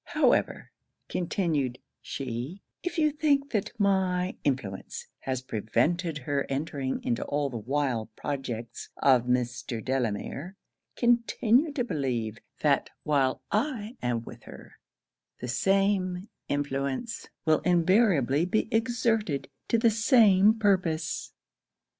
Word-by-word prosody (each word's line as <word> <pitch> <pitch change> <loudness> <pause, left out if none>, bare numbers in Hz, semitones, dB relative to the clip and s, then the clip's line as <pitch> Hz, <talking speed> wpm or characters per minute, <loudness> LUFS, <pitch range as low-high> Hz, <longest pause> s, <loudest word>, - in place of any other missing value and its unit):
'However,' - - +1 0.4
continued 160 -8 -1 0.2
she, 135 - -5 0.2
'if 355 0 -4
you 305 -2 +3
think 285 -2 +1
that 210 -4 0
my 190 -2 +1
influence 125 -9 -3
has 130 -1 -3
prevented 150 - 0
her 140 0 -2
entering 135 -1 -2
into 120 - 0
all 145 -1 -1
the 120 - -4
wild 125 -2 -1
projects 120 -4 -5
of 130 -3 +4
Mr. 125 0 -1
Delamere, 130 - -2 0.4
continue 240 +4 +3
to 265 -4 0
believe, 120 - -2 0.2
that 145 -2 +2
while 140 -3 +1
I 225 0 -1
am 120 -2 -1
with - - -11
her - - -13 0.6
the 125 - -5
same 190 - +1 0.2
influence 145 - -2 0.2
will 155 -1 +4
invariably 175 - +3
be 215 +4 +1
exerted 225 - 0 0.2
to 230 - +3
the 230 0 +4
same 220 -2 +5
purpose.' 180 -7 0
155 Hz, 110 wpm, -28 LUFS, 130-210 Hz, 0.6 s, same